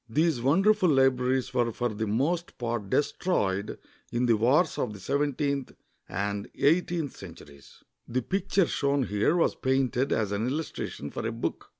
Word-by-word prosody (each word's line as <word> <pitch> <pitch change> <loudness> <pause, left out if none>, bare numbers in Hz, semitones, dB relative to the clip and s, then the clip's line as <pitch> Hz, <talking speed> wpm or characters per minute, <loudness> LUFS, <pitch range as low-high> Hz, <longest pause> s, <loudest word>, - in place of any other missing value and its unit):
These 155 0 +1
wonderful 190 - +3
Ubraries 130 -1 +2
were 120 -2 +1
for 120 +2 -1
the 110 0 -3
most 155 +11 -1
part 115 -4 -3
destroyed 100 - 0 0.3
in 120 +1 +1
the 115 -2 +4
wars 130 - +2
of 105 - -1
the 100 - -10
seventeenth 140 +2 -1 0.4
and 100 +2 -3
eighteenth 165 -1 +1
centuries. 75 -7 -13 0.2
The 125 +1 -1
picture 195 +1 +1
shown 140 -2 0
here 105 - +1
was 165 - +2
painted 130 0 0
as 110 -3 0
an 105 +3 -1
illustration 140 - -4
for - - -5
a - - -2
book. 115 - -4
125 Hz, 155 wpm, -28 LUFS, 110-145 Hz, 0.4 s, the